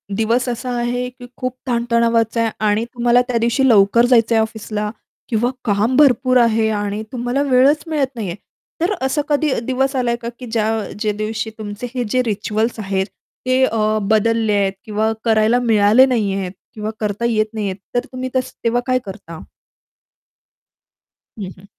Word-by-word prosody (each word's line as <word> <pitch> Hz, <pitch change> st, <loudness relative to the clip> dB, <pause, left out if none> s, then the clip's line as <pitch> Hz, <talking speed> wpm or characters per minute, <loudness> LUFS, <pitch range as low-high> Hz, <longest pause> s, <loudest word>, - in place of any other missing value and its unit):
दिवस 230 Hz, +3 st, +1 dB
असा 245 Hz, +1 st, -4 dB
आहे 245 Hz, +1 st, -1 dB
की 250 Hz, 0 st, -13 dB
खूप 255 Hz, 0 st, -3 dB
ताण-तणावाचा 235 Hz, -1 st, +1 dB
आहे 225 Hz, -1 st, +1 dB, 0.2 s
आणि 210 Hz, +2 st, +1 dB
तुम्हाला 240 Hz, 0 st, +2 dB
त्या 245 Hz, -, 0 dB
दिवशी 235 Hz, +4 st, +2 dB
लवकर 215 Hz, +2 st, +5 dB
जायचं 235 Hz, -2 st, +4 dB
आहे 220 Hz, -, +4 dB
ऑफिसला. 215 Hz, -1 st, -3 dB, 0.4 s
किंवा 235 Hz, +1 st, +1 dB, 0.2 s
काम 215 Hz, +3 st, +1 dB
भरपूर 255 Hz, -3 st, +4 dB
आहे 225 Hz, -2 st, +3 dB
आणि 205 Hz, 0 st, -2 dB
तुम्हाला 245 Hz, +2 st, -1 dB
वेळच 280 Hz, +2 st, +3 dB
मिळत 300 Hz, -4 st, 0 dB
नाहीये. 200 Hz, -7 st, -4 dB, 0.5 s
तर 355 Hz, +5 st, +1 dB
असा 265 Hz, +3 st, +1 dB
कधी 295 Hz, 0 st, +2 dB
दिवस 265 Hz, +2 st, 0 dB
आला 245 Hz, -2 st, +1 dB
का 235 Hz, -, -4 dB
की 255 Hz, -, -7 dB
ज्या 220 Hz, -1 st, +1 dB, 0.3 s
जे 215 Hz, -1 st, 0 dB
दिवशी 215 Hz, +2 st, -3 dB
तुमचे 210 Hz, +2 st, -6 dB
हे 250 Hz, -2 st, -1 dB
जे 255 Hz, +4 st, +2 dB
रिच्युअल्स 220 Hz, +2 st, -1 dB
आहेत, 195 Hz, -2 st, -1 dB, 0.4 s
ते 255 Hz, +1 st, +3 dB
अ, 215 Hz, -2 st, 0 dB
बदलले 220 Hz, 0 st, +2 dB
आहेत 200 Hz, -1 st, +1 dB
किंवा 215 Hz, +1 st, 0 dB
करायला 225 Hz, +1 st, +3 dB
मिळाले 225 Hz, +1 st, +5 dB
नाहीयेत. 200 Hz, -7 st, -1 dB, 0.2 s
किंवा 215 Hz, 0 st, -4 dB
करता 210 Hz, +1 st, -2 dB
येत 220 Hz, -2 st, +2 dB
नाहीयेत 205 Hz, -4 st, -2 dB, 0.2 s
तर 245 Hz, +1 st, +1 dB
तुम्ही 255 Hz, 0 st, -4 dB
तसं 255 Hz, -1 st, -2 dB
तेव्हा 235 Hz, +1 st, +1 dB
काय 255 Hz, -1 st, +2 dB
करता? 190 Hz, -5 st, -9 dB, 2.0 s
हं, 195 Hz, -3 st, -4 dB
हं. 190 Hz, -, -16 dB
230 Hz, 160 wpm, -19 LUFS, 215-250 Hz, 2.0 s, लवकर